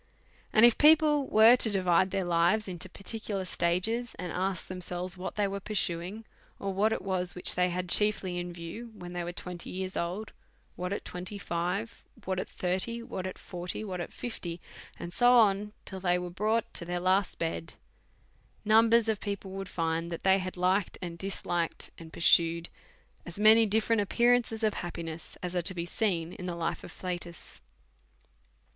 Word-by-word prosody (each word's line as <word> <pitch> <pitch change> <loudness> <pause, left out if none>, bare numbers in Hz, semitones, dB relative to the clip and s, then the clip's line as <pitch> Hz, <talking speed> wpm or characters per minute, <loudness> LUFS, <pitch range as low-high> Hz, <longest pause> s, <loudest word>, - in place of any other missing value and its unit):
And 220 +2 +7
if 240 - +5
people 300 -2 +5
were 220 +3 +7
to 225 - +3
divide 185 -2 +3
their 195 0 -1
lives 175 +5 +2
into 185 0 -4
parti 200 +4 -5
cular 200 -3 -3
stages, 185 +8 0
and 180 -2 -5
ask 190 0 -1
themselves 180 0 -5
what 185 0 -6
they 205 -1 +1
were 200 0 -3
pur 210 +2 -6
suing, 185 +4 -2 0.3
or 195 -1 -3
what 210 +3 +2
it 225 - -1
vras 185 -2 -1
wliich 180 - +2
they 180 0 +2
had 180 +1 -3
chiefly 190 -2 +2
in 175 0 -4
view 175 +8 -8
when 175 -3 -9
tliey 175 -1 -3
were 175 - -3
twenty 175 -1 -7
years 185 0 -4
old, 185 +6 -3 0.4
what 180 +1 -4
at 200 - -3
twenty 180 +3 -5
five, 180 +4 -3 0.2
what 185 -1 -1
at - - -4
thirty, 190 +6 -1
what 185 -5 -5
at 185 - -7
forty, 180 +3 -6
what 185 -4 -4
at 170 - -6
fifty, 175 -8 -5 0.4
and 175 0 -7
so 245 +4 +5
on, 210 -3 +4
till 190 - -6
they 180 -1 +2
were 180 0 -5
brought 215 +5 0
to - - -2
their 175 +1 -3
last 185 +2 +1
bed; 125 - -3 0.9
numbers 225 +1 +5
of 220 -2 0
people 200 -2 -5
would 195 -1 -6
find 165 0 -1
that 170 - -5
they 190 0 +5
had 185 -1 -5
liked 185 +2 +1
and 170 -1 -6
disliked, 175 -3 -2
and 165 -1 -11
pursued 170 0 +3 0.5
as 175 +2 -9
many 220 +1 +7
diiferent 220 +1 +2
appearances 235 +1 +2
of 215 -1 +3
happiness 170 -2 -6
as 180 0 -4
are 175 - +2
t(vbe 175 -1 -3
seen 175 -5 -1
in 180 - -7
the 175 - -3
life 170 -1 -3
of - - -9
Flatus. 175 -2 -7
185 Hz, 185 wpm, -30 LUFS, 175-215 Hz, 0.9 s, And